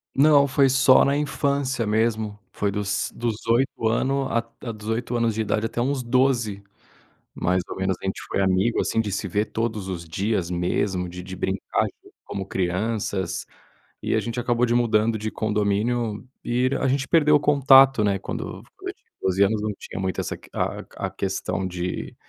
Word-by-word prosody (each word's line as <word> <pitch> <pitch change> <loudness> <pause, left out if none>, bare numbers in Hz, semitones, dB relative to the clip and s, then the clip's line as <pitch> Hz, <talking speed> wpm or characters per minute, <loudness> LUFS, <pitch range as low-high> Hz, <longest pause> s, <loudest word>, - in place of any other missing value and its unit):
Não 145 0 +6
foi 140 0 +3
só 130 0 +6
na 140 - +2
infância 140 -5 0
mesmo. 110 -1 0
Foi 100 - -1
dos 100 0 -2
dos 115 -2 -1
8 115 -1 +1
ano 135 +4 +1
a 115 0 0
a 115 - -4
dos 110 -1 -10
8 120 +2 -2
anos 115 -1 +1
de 110 - -1
idade 110 +1 0
até 120 +1 -2
uns 135 0 0
12, 120 -5 +1 0.7
mais 90 0 0
ou - - -6
menos. 95 -1 -1
A - - -9
gente 95 - -3
foi - - -1
amigo, 95 +4 +2
assim, 115 - +1
de 105 -3 -3
se 100 +1 -2
ver 105 +4 0
todos 110 -3 -3
os 85 -3 -5
dias, 95 +1 -1
mesmo 90 +1 -1
de 90 +1 -8
de 95 0 -7
brincar 95 +1 -1 0.4
como 95 -1 -5
crianças 95 0 -2 0.6
e - - 0
a - - +3
gente 115 +1 -3
acabou 120 0 +2
de 120 - +1
mudando 115 -2 +2
de 110 +1 -4
condomínio 105 +2 0 0.2
e 125 +2 +1
a 135 - +1
gente 135 +1 0
perdeu 150 -2 +5
o - - +5
contato, 135 -4 +6
né. 100 -1 +1
Quando - - -5 0.2
quando - - -6
eu - - -5
tinha - - -40
12 95 +1 +3
anos, 105 +2 +2
não 105 - -1
tinha - - -7
muito 95 -1 -1
essa - - -4
que - - -18
a - - -2 0.2
a - - -6
questão 95 0 -2
de 90 0 -4
110 Hz, 190 wpm, -24 LUFS, 95-125 Hz, 0.7 s, Não